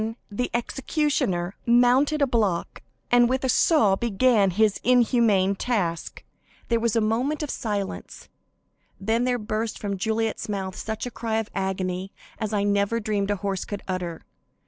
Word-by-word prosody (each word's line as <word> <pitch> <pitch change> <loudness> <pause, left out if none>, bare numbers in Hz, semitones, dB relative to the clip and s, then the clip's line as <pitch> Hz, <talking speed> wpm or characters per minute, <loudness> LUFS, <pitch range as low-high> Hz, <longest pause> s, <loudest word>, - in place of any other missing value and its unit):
Then 225 +1 -3 0.2
the 250 +5 -2
executioner 240 - -1
mounted 250 +5 +4
a - - +6
block, 215 -9 -1 0.3
and 240 0 +5
with 260 +1 0
a 260 - 0
saw 225 - +4
began 225 -1 +2
his 210 +2 +2
inhuman 230 -6 +3
task. 195 -7 -2 0.5
There 230 -1 +2
was 235 -1 0
a 230 - +3
moment 250 +8 0
of 295 - -3
silence, 205 -5 -4 0.7
then 225 +4 0
there 250 -1 +1
burst 215 0 -3
from 200 -1 -3
Juliet's 220 +1 -1
mouth 190 -2 -3
such 220 +1 -4
a 245 - -5
cry 225 -1 -3
of 225 -1 -3
agony 190 0 -2 0.3
as 215 -1 -2
I 205 -2 +1
never 205 +2 +1
dreamed 205 -2 -1
a 205 - +2
horse 195 -2 -1
could 205 -1 -6
utter. 180 -3 -4
220 Hz, 160 wpm, -25 LUFS, 195-245 Hz, 0.7 s, a